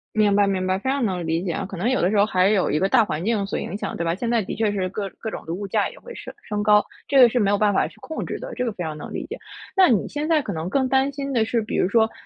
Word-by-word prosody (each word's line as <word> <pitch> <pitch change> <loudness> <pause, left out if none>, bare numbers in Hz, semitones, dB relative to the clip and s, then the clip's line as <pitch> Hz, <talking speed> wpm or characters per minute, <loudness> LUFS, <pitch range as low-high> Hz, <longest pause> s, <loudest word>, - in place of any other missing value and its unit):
明 210 -2 +3
白， 205 0 +4
明 190 -2 -1
白， 185 0 +1
非 260 +7 -2
常 275 0 0
能 180 -3 -3
理 165 +1 0
解 180 -3 -2
啊， - - -3
可 195 - -8
能 215 - 0
有 260 - +1
的 180 - +3
时 210 - +1
候 205 - +5
还 185 -3 +2
有 200 -4 +2
一 150 - +1
个 190 - +2
大 235 +4 +4
环 165 -5 -3
境 210 -2 0
所 200 - -3
影 - - -5
响， - - -4
对 170 - -2
吧？ 165 0 0
现 230 +5 -3
在 235 -2 +2
的 190 - -5
确 220 -1 +1
是 195 -2 -1
各 200 +1 -4
各 220 - -5
种 - - -7
的 165 - -3
物 200 +3 -5
价 - - 0
也 - - -12
会 485 -1 -11
升 - - -9
升 210 -1 -3
高， 210 0 +5 0.2
这 275 - +3
个 245 -2 +8
是 245 - +1
没 200 -4 +2
有 205 - +3
办 210 0 +2
法 195 - +1
去 - - -19
控 320 - -5
制 - - -4
的， - - -8
这 250 - -3
个 240 - 0
非 180 - -4
常 155 -1 -4
能 - - -8
理 - - -3
解。 - - -7 0.4
那 380 -2 +6
你 220 -8 +2
现 295 +1 -3
在 320 -3 +3
可 205 - -4
能 160 0 -4
更 265 +6 +1
担 265 +1 +2
心 275 0 -5
的 225 -4 +2
是， 230 0 0
比 215 - -4
如 - - +2
说 220 +1 +3
210 Hz, 370 characters per minute, -23 LUFS, 190-250 Hz, 0.4 s, 个